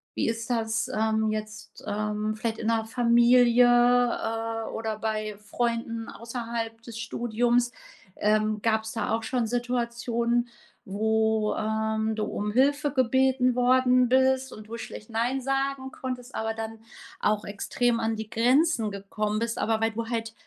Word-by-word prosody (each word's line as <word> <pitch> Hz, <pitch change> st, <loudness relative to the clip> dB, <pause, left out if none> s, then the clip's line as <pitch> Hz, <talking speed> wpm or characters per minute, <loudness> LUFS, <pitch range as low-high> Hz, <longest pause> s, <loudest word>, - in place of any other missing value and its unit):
Wie -, -, 0 dB
ist 230 Hz, +1 st, -4 dB
das, 225 Hz, -2 st, 0 dB
ähm, 220 Hz, 0 st, 0 dB
jetzt, 215 Hz, 0 st, -7 dB
ähm, 210 Hz, +1 st, -2 dB
vielleicht 225 Hz, 0 st, -3 dB
in 220 Hz, -, -3 dB
der 225 Hz, -1 st, +1 dB
Familie, 240 Hz, +1 st, +5 dB
äh, 240 Hz, -2 st, +2 dB
oder 220 Hz, -1 st, -3 dB
bei 215 Hz, -1 st, -2 dB
Freunden 230 Hz, +1 st, -2 dB
außerhalb 230 Hz, -1 st, -5 dB
des 230 Hz, -1 st, -9 dB
Studiums. 240 Hz, +1 st, 0 dB, 0.4 s
Ähm, 215 Hz, 0 st, +1 dB
gabs 220 Hz, 0 st, 0 dB
da 225 Hz, -, -2 dB
auch 225 Hz, 0 st, -1 dB
schon 245 Hz, +1 st, 0 dB
Situationen, 240 Hz, 0 st, -1 dB, 0.4 s
wo, 220 Hz, +1 st, +1 dB
ähm, 220 Hz, 0 st, -1 dB
du 215 Hz, -, -2 dB
um 210 Hz, +1 st, -3 dB
Hilfe 285 Hz, +5 st, +2 dB
gebeten 260 Hz, -1 st, +2 dB
worden 250 Hz, 0 st, +4 dB
bist 260 Hz, +1 st, +2 dB
und 215 Hz, 0 st, -11 dB
du 230 Hz, -, -5 dB
schlecht 215 Hz, -1 st, -9 dB
„nein“ 240 Hz, +4 st, 0 dB
sagen 270 Hz, 0 st, -1 dB
konntest, 255 Hz, -1 st, -6 dB
aber 225 Hz, 0 st, -1 dB
dann 225 Hz, 0 st, -6 dB, 0.4 s
auch 210 Hz, 0 st, +1 dB
extrem 230 Hz, +4 st, -1 dB
an 225 Hz, 0 st, 0 dB
die 220 Hz, 0 st, -6 dB
Grenzen 245 Hz, 0 st, +2 dB
gekommen 210 Hz, +2 st, -3 dB
bist, 230 Hz, 0 st, -2 dB
aber 220 Hz, 0 st, 0 dB
weil 225 Hz, 0 st, +2 dB
du 230 Hz, +1 st, -4 dB
halt 225 Hz, -1 st, -3 dB
230 Hz, 145 wpm, -27 LUFS, 220-245 Hz, 0.4 s, Familie